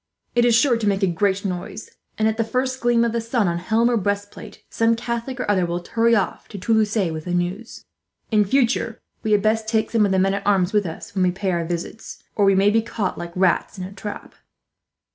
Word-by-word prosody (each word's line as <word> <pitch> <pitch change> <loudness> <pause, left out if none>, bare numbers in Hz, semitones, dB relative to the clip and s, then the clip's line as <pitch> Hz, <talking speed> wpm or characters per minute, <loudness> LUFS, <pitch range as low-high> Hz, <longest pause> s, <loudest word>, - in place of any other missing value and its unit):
It 240 0 +3
is 235 -2 +4
sure 240 +1 +4
to 220 -2 -2
make 200 0 +1
a - - +4
great 195 +3 0
noise 185 +3 -5 0.3
and, 220 - +2
at 220 0 0
the 225 - +2
first 255 +3 -2
gleam 240 -1 +3
of 230 - 0
the 235 0 -1
sun 230 -2 0
on 170 0 -1
helm 225 +6 +2
or 240 -1 +2
breast 205 0 -2
plate, - - -12
some 230 0 +2
Catholic 235 +2 -4
or - - -1
other 200 -3 +2
will 175 0 -3
hurry 230 0 +3
off 200 - -2
to 205 - -9
Toulouse 215 +2 +1 0.2
with 155 -1 -6
the 180 -1 -1
news. 180 +6 -4 0.5
In 210 -1 +4
future 230 0 +1 0.2
we 220 - -2
had 205 -1 +3
best 220 0 +1
take 220 -1 0
some 225 -2 +3
of - - -2
the 190 - +2
men 195 +1 +2
at 200 0 -4
arms 195 -2 +2
with 205 -3 +2
us, 165 +6 -8
when 190 - -1
we 180 - +4
pay 190 +1 -2
our 170 -1 -1
visits, 175 +6 -6
or 205 - +3
we 195 0 +4
may 200 +2 +4
be 225 +1 +3
caught 215 -3 -3
like 170 0 -6
rats 185 +2 +1
in 185 - -5
a 185 - -7
trap." 205 +1 -8
210 Hz, 245 wpm, -22 LUFS, 190-230 Hz, 0.5 s, is